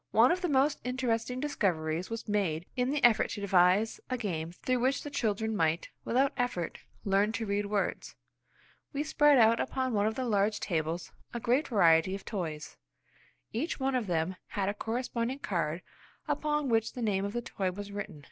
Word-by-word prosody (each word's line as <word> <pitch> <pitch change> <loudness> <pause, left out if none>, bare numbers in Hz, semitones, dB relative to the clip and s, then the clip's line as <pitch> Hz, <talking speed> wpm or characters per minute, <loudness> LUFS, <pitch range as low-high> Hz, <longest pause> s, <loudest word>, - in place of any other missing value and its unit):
One 230 +4 +5
of 365 +1 -1
our 355 - +1
most 280 +1 +3
interesting 250 -1 -1
discoveries 180 - -1
was 230 0 -5
made 185 -6 0
in 250 0 +1
the 290 0 -1
effort 235 -2 +5
to 205 - -5
devise 190 +2 +3
a 255 - -1
game 170 -8 -3
through 255 +8 -1
which 260 +3 +1
the 290 - -6
children 220 -3 -1
might, 165 -3 +1 0.2
without 270 +4 +2
effort, 245 -10 -2 0.3
learn 200 +2 +3
to 225 +1 -2
read 200 0 -1
words. 205 -1 -2 0.8
We 285 +1 -1
spread 295 -2 +4
out 230 -1 +5
upon 260 -1 -1
one 205 0 +2
of 220 - -1
the 260 - -2
large 210 -2 +1
tables 165 -1 -2 0.2
a - - -1
great 255 +6 +1
variety 175 -4 +4
of 195 - -9
toys. 160 -7 -5 0.8
Each 285 +10 -2
one 270 0 0
of 245 -5 0
them 175 +1 -1
had 195 -1 -1
a - - -1
corresponding 235 +3 -2
card 170 - -2 0.4
upon 300 -1 0
which 225 -1 +1
the 245 - -4
name 200 -3 +1
of 200 +1 -3
the 240 0 -2
toy 190 -5 -2
was 205 +2 -7
written. 200 -6 -6
220 Hz, 185 wpm, -30 LUFS, 190-255 Hz, 0.8 s, One